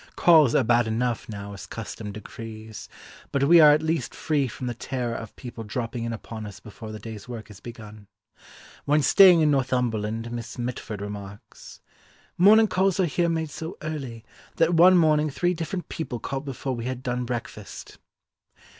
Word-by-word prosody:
Calls 155 Hz, -8 st, +5 dB
are -, -, +4 dB
bad 120 Hz, 0 st, +3 dB
enough 115 Hz, +1 st, -1 dB
now 100 Hz, -1 st, -7 dB
as 100 Hz, -, -9 dB
custom 110 Hz, -1 st, -7 dB
decrees, 110 Hz, +1 st, -9 dB, 0.4 s
but 140 Hz, -, +1 dB
we 170 Hz, +4 st, +7 dB
are 155 Hz, -2 st, +9 dB
at 150 Hz, +1 st, +3 dB
least 160 Hz, +1 st, -1 dB
free 145 Hz, -4 st, 0 dB
from 125 Hz, +2 st, -7 dB
the 120 Hz, -, -2 dB
terror 120 Hz, 0 st, -3 dB
of 115 Hz, -1 st, -7 dB
people 120 Hz, -3 st, -8 dB
dropping 115 Hz, +2 st, -4 dB
in 115 Hz, -, -3 dB
upon 110 Hz, -1 st, -7 dB
us 100 Hz, -, -10 dB
before 110 Hz, +1 st, -10 dB
the 110 Hz, -, -6 dB
day's 110 Hz, +1 st, -9 dB
work 115 Hz, -3 st, -8 dB
is 100 Hz, -, -13 dB
begun. 110 Hz, -3 st, -11 dB, 0.8 s
When 150 Hz, +1 st, +3 dB
staying 180 Hz, +2 st, +7 dB
in 150 Hz, -1 st, +4 dB
Northumberland 120 Hz, -4 st, -1 dB
Miss 120 Hz, +1 st, -6 dB
Mitford 120 Hz, -4 st, -5 dB
remarks, 100 Hz, 0 st, -9 dB, 0.5 s
"Morning 215 Hz, +5 st, +7 dB
calls 190 Hz, 0 st, +1 dB
are 185 Hz, -, +4 dB
here 170 Hz, +2 st, 0 dB
made 160 Hz, -2 st, -2 dB
so 160 Hz, +4 st, -7 dB
early, 135 Hz, -8 st, -5 dB, 0.3 s
that 165 Hz, +1 st, +2 dB
one 180 Hz, +2 st, +7 dB
morning 155 Hz, -2 st, +3 dB
three 175 Hz, +5 st, 0 dB
different 175 Hz, +2 st, -4 dB
people 135 Hz, -7 st, -4 dB
called 135 Hz, +3 st, -4 dB
before 135 Hz, -1 st, -4 dB
we 115 Hz, 0 st, -5 dB
had 130 Hz, 0 st, -4 dB
done 125 Hz, 0 st, -2 dB
breakfast." 120 Hz, -4 st, -7 dB
125 Hz, 175 wpm, -25 LUFS, 110-155 Hz, 0.8 s, are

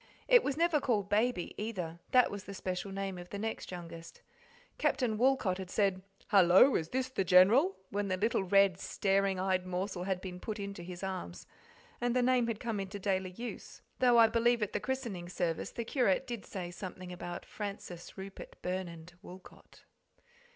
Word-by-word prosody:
It -, -, +7 dB
was 280 Hz, 0 st, -1 dB
never 335 Hz, -2 st, +3 dB
called 210 Hz, -7 st, 0 dB
"Baby," 215 Hz, -2 st, +1 dB
either; 180 Hz, -7 st, -4 dB
that 250 Hz, -1 st, +5 dB
was 205 Hz, 0 st, -6 dB
the 200 Hz, -, -7 dB
special 185 Hz, +1 st, -4 dB
name 195 Hz, -1 st, -4 dB
of 175 Hz, 0 st, -10 dB
the 200 Hz, -, -5 dB
next 220 Hz, +2 st, -4 dB
youngest. 170 Hz, -2 st, -9 dB, 0.6 s
Captain 245 Hz, -5 st, +1 dB
Woolcot 230 Hz, -6 st, +2 dB
had 190 Hz, -1 st, -6 dB
said, 195 Hz, -2 st, +1 dB, 0.3 s
"Hello, 195 Hz, +6 st, +7 dB
is 160 Hz, 0 st, 0 dB
this 260 Hz, 0 st, -1 dB
the 230 Hz, -7 st, -1 dB
General?" 200 Hz, -, +6 dB, 0.2 s
when 205 Hz, 0 st, -1 dB
the 185 Hz, -1 st, 0 dB
little, 215 Hz, 0 st, +1 dB
red, 195 Hz, -1 st, +4 dB
staring 195 Hz, -2 st, +1 dB
eyed 185 Hz, -1 st, 0 dB
morsel 185 Hz, 0 st, -3 dB
had 190 Hz, -1 st, -1 dB
been 180 Hz, -1 st, -7 dB
put 215 Hz, +2 st, -5 dB
into 200 Hz, -2 st, -5 dB
his 180 Hz, +1 st, -8 dB
arms, 185 Hz, -, -5 dB, 0.6 s
and 245 Hz, 0 st, +1 dB
the 250 Hz, -, +3 dB
name 250 Hz, -1 st, +3 dB
had 225 Hz, -2 st, -2 dB
come 230 Hz, -4 st, -2 dB
into 195 Hz, +1 st, -5 dB
daily 190 Hz, -1 st, -1 dB
use, 230 Hz, +7 st, -8 dB, 0.2 s
though 245 Hz, -2 st, +5 dB
I 230 Hz, -, +9 dB
believe 235 Hz, 0 st, +2 dB
at 205 Hz, -, -3 dB
the -, -, 0 dB
christening 215 Hz, -7 st, -4 dB
service 175 Hz, -2 st, -2 dB
the 235 Hz, -, -5 dB
curate 245 Hz, -2 st, +2 dB
did 240 Hz, -5 st, -6 dB
say 180 Hz, -3 st, -5 dB
something 185 Hz, -1 st, -7 dB
about 175 Hz, 0 st, -6 dB
Francis 200 Hz, -4 st, -7 dB
Rupert 195 Hz, 0 st, -9 dB
Burnand 175 Hz, -2 st, -4 dB
Woolcot. 180 Hz, +1 st, -14 dB
195 Hz, 180 wpm, -32 LUFS, 185-230 Hz, 0.6 s, I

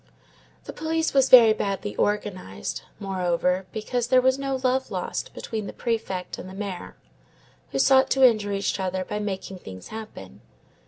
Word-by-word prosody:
The -, -, -8 dB
police 320 Hz, 0 st, -1 dB
was 270 Hz, -1 st, +4 dB
very 230 Hz, -4 st, +9 dB
badly 205 Hz, -1 st, -3 dB
organized, 185 Hz, -, -2 dB, 0.2 s
moreover, 180 Hz, -1 st, 0 dB
because 235 Hz, +2 st, -2 dB
there 255 Hz, +1 st, +5 dB
was 260 Hz, +1 st, +2 dB
no 275 Hz, -1 st, -1 dB
love 260 Hz, +1 st, +1 dB
lost -, -, -4 dB
between 215 Hz, -3 st, -4 dB
the -, -, -7 dB
Prefect 220 Hz, -6 st, -3 dB
and 185 Hz, -, -8 dB
the 190 Hz, -, -10 dB
Mayor, 195 Hz, -3 st, -6 dB, 0.7 s
who -, -, -3 dB
sought 265 Hz, -1 st, +5 dB
to 270 Hz, -1 st, +5 dB
injure 215 Hz, -4 st, 0 dB
each 200 Hz, 0 st, -1 dB
other 185 Hz, 0 st, -2 dB
by 210 Hz, -, -3 dB
making 195 Hz, -2 st, -4 dB
things 95 Hz, -, -10 dB
happen. 215 Hz, -, -9 dB
210 Hz, 160 wpm, -25 LUFS, 185-250 Hz, 0.7 s, very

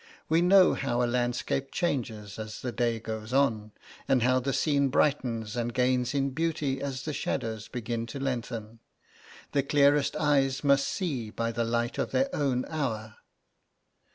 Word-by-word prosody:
We 165 Hz, +2 st, +4 dB
know 185 Hz, +1 st, +6 dB
how 125 Hz, -2 st, 0 dB
a -, -, +3 dB
landscape 125 Hz, +2 st, -1 dB
changes 115 Hz, -, -2 dB
as 110 Hz, 0 st, -6 dB
the 125 Hz, -, -3 dB
day 115 Hz, -1 st, 0 dB
goes 110 Hz, +1 st, -6 dB
on, 115 Hz, -6 st, +1 dB, 0.4 s
and 130 Hz, -3 st, +3 dB
how 130 Hz, +1 st, +3 dB
the 135 Hz, +2 st, -2 dB
scene 140 Hz, 0 st, +2 dB
brightens 120 Hz, -6 st, 0 dB
and 120 Hz, 0 st, -1 dB
gains 125 Hz, +1 st, +1 dB
in 140 Hz, 0 st, +1 dB
beauty 145 Hz, -3 st, -1 dB
as 135 Hz, -2 st, -4 dB
the 155 Hz, -, -3 dB
shadows 110 Hz, -5 st, -3 dB
begin 115 Hz, -1 st, -4 dB
to 140 Hz, -, -6 dB
lengthen. 115 Hz, -4 st, -4 dB, 0.7 s
The 140 Hz, -, +2 dB
clearest 140 Hz, +1 st, +3 dB
eyes 135 Hz, -2 st, +2 dB
must 140 Hz, -1 st, +4 dB
see 135 Hz, -, -2 dB
by 115 Hz, +1 st, -2 dB
the 115 Hz, 0 st, -1 dB
light 120 Hz, +1 st, -1 dB
of -, -, 0 dB
their 275 Hz, +1 st, 0 dB
own 130 Hz, -4 st, 0 dB
hour. 110 Hz, -8 st, -3 dB
125 Hz, 160 wpm, -28 LUFS, 115-140 Hz, 0.7 s, know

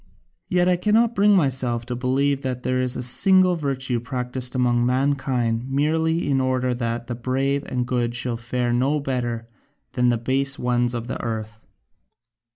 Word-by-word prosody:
Yet 180 Hz, -1 st, +2 dB
I 180 Hz, -1 st, +3 dB
cannot 220 Hz, +5 st, +2 dB
bring 205 Hz, -1 st, +4 dB
myself 130 Hz, -7 st, +1 dB
to 125 Hz, 0 st, -4 dB
believe 135 Hz, +3 st, 0 dB
that 125 Hz, -2 st, -4 dB
there 130 Hz, 0 st, 0 dB
is 125 Hz, -1 st, -1 dB
a -, -, -3 dB
single 185 Hz, +8 st, +4 dB
virtue 135 Hz, -5 st, -2 dB
practised 125 Hz, +1 st, -4 dB
among 120 Hz, -1 st, +2 dB
mankind 130 Hz, -2 st, 0 dB
merely 160 Hz, +4 st, 0 dB
in 135 Hz, -2 st, +2 dB
order 130 Hz, -1 st, 0 dB
that 120 Hz, -1 st, -3 dB
the 120 Hz, -, -4 dB
brave 135 Hz, +4 st, -1 dB
and 125 Hz, -1 st, -2 dB
good 120 Hz, -1 st, -1 dB
should 120 Hz, -1 st, -1 dB
fare 120 Hz, 0 st, -1 dB
no 135 Hz, +5 st, +1 dB
better 120 Hz, -4 st, -3 dB, 0.4 s
than 125 Hz, -2 st, +2 dB
the 120 Hz, -, +2 dB
base 135 Hz, +4 st, 0 dB
ones 120 Hz, 0 st, 0 dB
of 115 Hz, -1 st, -4 dB
the 125 Hz, -, -5 dB
earth. 110 Hz, -1 st, -5 dB
130 Hz, 165 wpm, -23 LUFS, 120-140 Hz, 0.4 s, bring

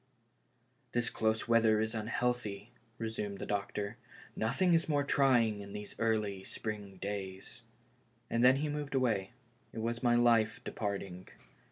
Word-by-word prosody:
" 125 Hz, +1 st, -41 dB
This 120 Hz, -1 st, +1 dB
close 110 Hz, 0 st, 0 dB
weather 115 Hz, -2 st, +4 dB
is 110 Hz, +1 st, 0 dB
unhealthy," 115 Hz, -1 st, -2 dB, 0.3 s
resumed 110 Hz, -3 st, -3 dB
the -, -, -5 dB
doc 100 Hz, -1 st, -2 dB
tor; 105 Hz, +3 st, -3 dB, 0.2 s
" -, -, -19 dB
nothing 170 Hz, +11 st, +2 dB
is 165 Hz, 0 st, +2 dB
more 145 Hz, -2 st, +2 dB
trying 125 Hz, -7 st, +3 dB
than 100 Hz, 0 st, -8 dB
these 105 Hz, 0 st, -6 dB
early 105 Hz, -4 st, 0 dB
spring 105 Hz, -2 st, -5 dB
days." 95 Hz, -1 st, -5 dB, 0.7 s
And 115 Hz, +1 st, +1 dB
then 130 Hz, +1 st, +7 dB
he 145 Hz, +3 st, -1 dB
moved 145 Hz, -1 st, -3 dB
away. 115 Hz, -7 st, +1 dB, 0.4 s
It -, -, -11 dB
was 115 Hz, +1 st, -2 dB
my 120 Hz, -1 st, +4 dB
life 115 Hz, -2 st, +4 dB
departing. 100 Hz, -3 st, -4 dB
110 Hz, 155 wpm, -33 LUFS, 105-125 Hz, 0.7 s, then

